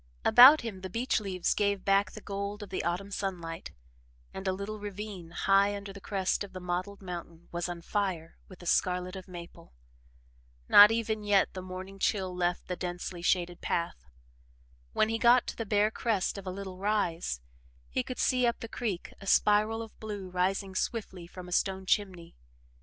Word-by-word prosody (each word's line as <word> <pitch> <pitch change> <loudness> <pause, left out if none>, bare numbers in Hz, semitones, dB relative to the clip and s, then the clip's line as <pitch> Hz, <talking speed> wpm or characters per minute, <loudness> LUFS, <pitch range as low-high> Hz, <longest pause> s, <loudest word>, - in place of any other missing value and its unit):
About 270 +5 +9
him, 215 -6 -6
the 190 - -5
beech 235 +7 0
leaves 190 -4 -1
gave 200 -2 0
back 195 +1 +3
the 215 - -9
gold 200 +1 -4
of 200 - -11
the 190 - -2
autumn 180 +4 -2
sunlight, 175 -5 -4 0.6
and 190 0 -6
a - - +3
little 200 +3 -5
ravine, 205 -3 -7
high 195 +3 +3
under 200 -1 -8
the 200 - -11
crest 195 0 -1
of 200 - -10
the 185 - -6
mottled 180 +3 -4
mountain, 170 -2 -8
was 175 +1 -2
on 170 -1 -6
fire 185 -6 -2
with 185 - -13
the 175 - -13
scarlet 180 +1 +1
of 190 -1 -8
maple. 170 -2 -11 0.9
Not 205 +1 +10
even 220 -1 -1
yet 205 -2 +3
had - - -29
the 185 - -5
morning 185 +1 -8
chill 190 -3 0
left 175 0 -1
the 180 - -2
densely 175 0 -5
shaded 175 0 0
path. 170 - -2 0.9
When 215 - +2
he 225 0 -1
got 240 +1 +5
to - - -6
the 225 - -5
bare 210 +1 +3
crest 220 -5 0
of 195 - -11
a - - -2
little 190 -1 -7
rise, 180 - 0 0.5
he - - -1
could 255 - -6
see 250 -2 +2
up 235 - 0
the 230 - -6
creek 220 -6 -4
a 195 - -9
spiral 215 +3 +3
of 225 - -14
blue 205 -4 -6
rising 190 +2 0
swiftly 190 -4 -3
from 180 0 -10
a - - -10
stone 190 +1 0
chimney. 185 -4 -1
195 Hz, 190 wpm, -30 LUFS, 180-205 Hz, 0.9 s, Not